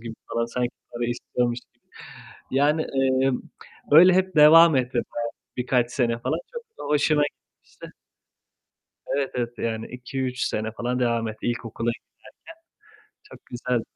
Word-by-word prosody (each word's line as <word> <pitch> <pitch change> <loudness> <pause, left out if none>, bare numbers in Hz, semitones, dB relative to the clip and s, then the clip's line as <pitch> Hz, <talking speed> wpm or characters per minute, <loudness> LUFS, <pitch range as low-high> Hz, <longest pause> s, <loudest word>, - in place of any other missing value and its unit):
gibi 115 -1 -7 0.2
falan. 115 0 0
Sanki 120 +1 -2 0.2
para 120 0 -3
istiyormuş 120 0 -2 0.2
gibi. - - -42 0.7
Yani, 145 +4 +2
eee, 135 0 +2 0.6
öyle 180 +5 +9
hep 185 -1 +1
devam 160 +1 +8
etti 125 0 0
bayağı 120 -1 -2 0.3
birkaç 125 -1 +1
sene 120 -3 0
falan. - - -2
Çok 470 - -6 0.2
da - - -6
hoşuma 150 0 +3
gitmişti. 145 - -10 1.2
Evet, 140 -1 -1
evet 120 -1 -3
yani 110 -1 -3
2-3 130 +1 -5
sene 110 +1 -2
falan 125 +2 -2
devam 115 -2 0
etti 110 0 -7
ilkokula 120 -1 -2
giderken. 120 - -10 1.1
Çok 420 - -16
güzel. 120 -1 -2
125 Hz, 140 wpm, -24 LUFS, 120-140 Hz, 1.2 s, öyle